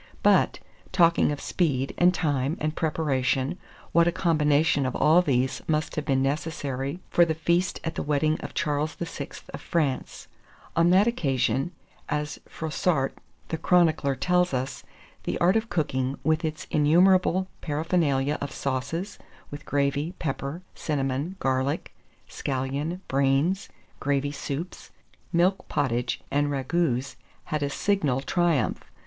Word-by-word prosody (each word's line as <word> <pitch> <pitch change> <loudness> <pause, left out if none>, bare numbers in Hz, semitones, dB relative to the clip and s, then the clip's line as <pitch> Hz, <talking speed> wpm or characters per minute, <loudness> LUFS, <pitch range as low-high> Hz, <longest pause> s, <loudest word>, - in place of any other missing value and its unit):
But, - - +4 0.3
talking 170 -3 +4
of 145 - -3
speed, 135 -7 0
and 180 +1 +5
time, 145 -4 0
and 155 0 -2
preparation, 145 0 0 0.3
what 170 0 +4
a - - +3
combination 155 -4 +2
of 130 - -3
all 160 +4 +5
these 130 -6 0
must 155 -1 0
have 150 - -2
been 135 -2 +2
necessary 140 0 -2
for 175 - +6
the 160 -2 +1
feast 170 +3 +1
at 165 - -3
the - - -3
wedding 150 +1 +1
of - - -7
Charles 150 0 -1
VI. 165 -4 -5 0.3
of - - -6
France. 150 -6 -2 0.5
On 170 +1 +4
that 190 +3 +5
occasion, 140 - 0 0.4
as 150 0 -2
Froissart 160 -3 -1 0.4
the 160 - -2
chronicler 160 -6 +3
tells 180 +2 +2
us, 130 +1 -3 0.4
the - - -1
art 180 +4 +3
of 225 +1 0
cooking, 135 -5 -1
with 160 +3 +1
its 155 -1 -3
innumerable 180 +4 +4
paraphernalia 150 -3 0
of 140 -1 -3
sauces, 150 +11 -3 0.3
with 145 0 -8
gravy, 145 +3 0
pepper, 145 +3 -4
cinnamon, 140 +3 -2
garlic, 130 +2 -1 0.3
scallion, 140 +6 -3
brains, 140 +7 +1 0.3
gravy 145 0 0
soups, 150 +4 -5 0.4
milk 180 +3 +2
potage, 120 -3 -1
and 145 +1 +2
ragoûts, 135 -1 -1 0.3
had 150 - -3
a 140 - 0
signal 150 -6 +1
triumph. 165 - +1
150 Hz, 135 wpm, -26 LUFS, 135-170 Hz, 0.5 s, for